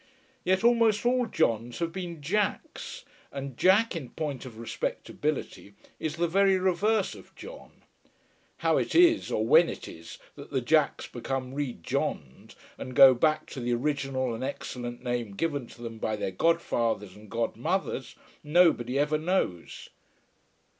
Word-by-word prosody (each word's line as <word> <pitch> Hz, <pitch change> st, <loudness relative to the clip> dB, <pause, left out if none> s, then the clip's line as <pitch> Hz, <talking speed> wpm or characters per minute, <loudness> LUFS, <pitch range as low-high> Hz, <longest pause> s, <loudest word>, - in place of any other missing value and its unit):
Yet 190 Hz, +3 st, +1 dB
almost 230 Hz, -2 st, +4 dB
all 250 Hz, 0 st, +2 dB
Johns 115 Hz, -, 0 dB
have 170 Hz, -1 st, -2 dB
been 170 Hz, -4 st, -6 dB
Jacks, 205 Hz, +6 st, -2 dB, 0.3 s
and 135 Hz, -2 st, -6 dB
Jack, 195 Hz, -, +4 dB
in 140 Hz, -7 st, -5 dB
point 145 Hz, -4 st, -4 dB
of 115 Hz, -3 st, -11 dB
respectability, 115 Hz, -1 st, -4 dB, 0.2 s
is 155 Hz, -1 st, -3 dB
the 170 Hz, 0 st, +1 dB
very 195 Hz, +2 st, +3 dB
reverse 190 Hz, +3 st, +1 dB
of -, -, -15 dB
John. -, -, -12 dB, 0.8 s
How -, -, +4 dB
it -, -, -1 dB
is, 340 Hz, -1 st, +5 dB
or 110 Hz, -, 0 dB
when -, -, +6 dB
it -, -, -7 dB
is, 80 Hz, 0 st, -10 dB, 0.2 s
that -, -, -11 dB
the -, -, 0 dB
Jacks -, -, +2 dB
become 130 Hz, -1 st, -4 dB
re 140 Hz, -3 st, -2 dB
Johned, 65 Hz, -4 st, -4 dB, 0.2 s
and 130 Hz, -1 st, -7 dB
go 135 Hz, -1 st, +9 dB
back 155 Hz, +5 st, +1 dB
to 135 Hz, -, -6 dB
the 120 Hz, 0 st, 0 dB
original 135 Hz, -2 st, -1 dB
and 115 Hz, -, -5 dB
excellent 120 Hz, -3 st, -5 dB
name 120 Hz, -5 st, -3 dB
given 145 Hz, -2 st, -2 dB
to 120 Hz, -, -13 dB
them 115 Hz, -1 st, -7 dB
by 110 Hz, -, -1 dB
their 105 Hz, -2 st, -3 dB
godfathers 115 Hz, -, 0 dB
and 105 Hz, 0 st, -14 dB
godmothers, 115 Hz, +1 st, -2 dB, 0.3 s
nobody 150 Hz, -6 st, +3 dB
ever 150 Hz, +2 st, +1 dB
knows. 155 Hz, -, -2 dB
140 Hz, 150 wpm, -28 LUFS, 120-180 Hz, 0.8 s, go